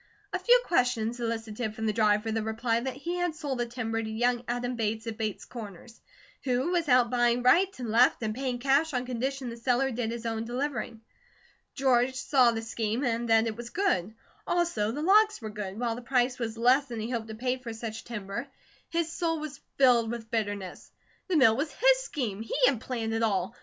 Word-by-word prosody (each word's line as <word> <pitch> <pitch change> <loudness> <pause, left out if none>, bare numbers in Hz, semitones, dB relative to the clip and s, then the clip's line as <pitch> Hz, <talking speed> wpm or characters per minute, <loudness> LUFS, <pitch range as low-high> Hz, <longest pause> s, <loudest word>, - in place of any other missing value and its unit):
A - - 0
few - - +6
questions 245 -6 +1
elicited 225 -1 -3
from 220 - -4
the 215 - +1
driver 215 0 +2
the 225 0 0
reply 225 +1 0
that 255 +2 -4
he 340 +6 -4
had 355 -3 -1
sold 285 -5 -4
the 240 - 0
timber 225 -2 -3
to 220 - -5
young 240 +2 0
Adam 245 +1 -2
Bates 220 0 -2
of 225 -1 -4
Bates 215 -2 -4
Corners, 225 -1 -10 0.4
who 260 +5 0
was 340 -4 0
out 250 -1 +4
buying 240 0 +2
right 340 +10 +5
and 240 -4 -4
left 240 +1 +4
and 215 -1 -1
paying 255 0 -2
cash 275 +4 +2
on 250 0 -1
condition 255 +1 -3
the 230 - -8
seller 250 +3 +1
did 235 -1 -2
his 235 0 -5
own 225 -1 -2
delivering. 240 -2 -3 0.7
George 260 -1 +2
saw 255 -1 +4
the 225 -1 -2
scheme, 225 +2 -2
and 235 -2 -1
that 225 0 +5
it 225 -1 -2
was 235 +1 -7
good. 220 - 0 0.3
Also 335 -12 +1
the 290 +6 -4
logs 425 +4 +5
were 220 -2 -6
good, 205 -1 -6
while 240 -2 0
the 240 - -7
price 250 0 +1
was 230 -2 -3
less 255 +4 +4
than 235 -4 -6
he 220 +3 -4
hoped 230 -3 -3
to 220 - -7
pay 250 +3 -1
for 250 -2 -7
such 225 0 -6
timber. 230 +2 -5 0.4
His 335 -1 -1
soul 330 -2 0
was 295 -2 -7 0.2
filled 245 -4 +5
with 230 -1 -6
bitterness. 205 -5 -3 0.4
The 365 -4 +2
mill 225 -6 +6
was 290 +4 -2
his - - +4
scheme. 245 - -4
He 225 - -4
had 250 -4 +2
planned 230 -4 -3
it 225 - 0
all. 200 0 0
240 Hz, 210 wpm, -28 LUFS, 225-265 Hz, 0.7 s, few